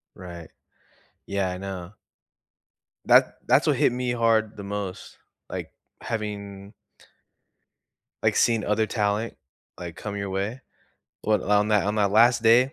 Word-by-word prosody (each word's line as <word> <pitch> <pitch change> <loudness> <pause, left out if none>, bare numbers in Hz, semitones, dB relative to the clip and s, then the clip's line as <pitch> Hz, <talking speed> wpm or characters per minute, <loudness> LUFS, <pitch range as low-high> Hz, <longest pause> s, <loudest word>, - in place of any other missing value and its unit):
Right. 85 -3 -10 0.8
Yeah, 100 -2 -1
I 90 - -4
know. 95 0 -7 1.1
That - - +5
that's - - +4
what - - +4
hit - - +3
me 125 0 -2
hard 115 -2 +2
the 100 - -7
most. 100 -1 -6 0.3
Like, - - -6 0.3
having 100 -2 -5 1.5
like, - - +2
seeing 115 -3 +3
other 105 +1 +1
talent, 105 +2 -1 0.4
like, 85 -1 -8
come 100 -1 -5
your 100 -1 -3
way. 100 +7 -3 0.6
What 110 0 +1
on 105 +1 +2
that 105 -2 +3
on 105 +1 0
that 100 -2 +2
last 120 +2 +5
day, 125 +5 +5
105 Hz, 135 wpm, -25 LUFS, 100-110 Hz, 1.5 s, That